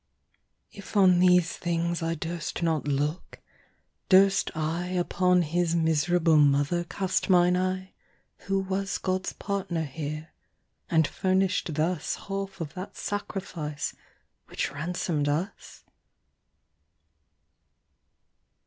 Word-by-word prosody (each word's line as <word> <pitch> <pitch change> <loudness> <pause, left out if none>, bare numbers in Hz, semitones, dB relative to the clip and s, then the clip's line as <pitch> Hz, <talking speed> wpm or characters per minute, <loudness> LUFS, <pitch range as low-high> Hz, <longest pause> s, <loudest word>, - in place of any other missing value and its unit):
If 200 +1 -7
on 185 -3 +6
these 180 -1 +4
things 170 0 -1
I 165 0 -1
durst 165 +1 -4
not 160 -4 0
looke, 145 +4 -2 0.7
durst 195 +1 +5
IUpon 175 +3 +1
his 170 +1 0
miserable 160 0 +3
mother 145 +4 +3
cast 190 +3 -1
mine 180 -1 +5
eye, 185 +1 -2 0.5
Who 195 0 +1
was 190 0 -2
Gods 185 0 -2
partner 195 -5 -2
here, 155 +2 -5 0.6
and 160 -1 +4
furnish'd 190 +2 +1
thusHalfe 190 +4 -2
of 160 -3 -5
that 185 +1 -8
Sacrifice, 185 -7 -4 0.5
which - - -3
ransom'd 150 0 -2
us? 165 +8 -4
175 Hz, 95 wpm, -27 LUFS, 160-185 Hz, 0.7 s, on